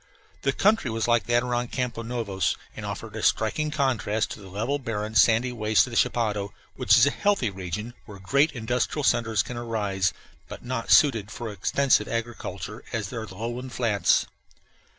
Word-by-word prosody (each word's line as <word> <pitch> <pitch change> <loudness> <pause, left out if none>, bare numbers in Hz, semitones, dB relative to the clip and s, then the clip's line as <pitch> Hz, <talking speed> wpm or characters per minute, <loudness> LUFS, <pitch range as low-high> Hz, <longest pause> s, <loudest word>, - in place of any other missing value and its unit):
The 135 - +1
country 200 - +2
was 115 0 -1
like 120 -1 +3
that 120 0 +3
around 120 -1 -2
Campos 120 -3 -3
Novos, 110 -6 -1 0.2
and - - -6
offered - - -6
a - - -4
striking 150 +8 +1
contrast 125 -7 0
to - - -7
the 95 -2 -12
level, 115 +9 -2
barren, 110 -4 -4
sandy 115 +3 +4
wastes 110 -2 +2
of 125 - -9
the - - -6
chapadao, 105 -4 0 0.2
which - - +4
is 120 - +7
a 145 - +2
healthy 200 - +1
region, 95 +5 -5
where 100 - -10
great 140 +11 +2
industrial 125 +5 -1
centres 115 -5 +2
can 125 - -7
arise, 105 -5 -1 0.4
but - - -10
not 120 -2 -3
suited 115 -9 +5
for 115 0 -6
extensive 105 +3 +2
agriculture 115 -3 -5
as 110 -2 -3
are 115 -2 -5
the 95 - -11
lowland 120 +4 -5
flats. 105 -6 +2
115 Hz, 175 wpm, -26 LUFS, 105-125 Hz, 0.4 s, is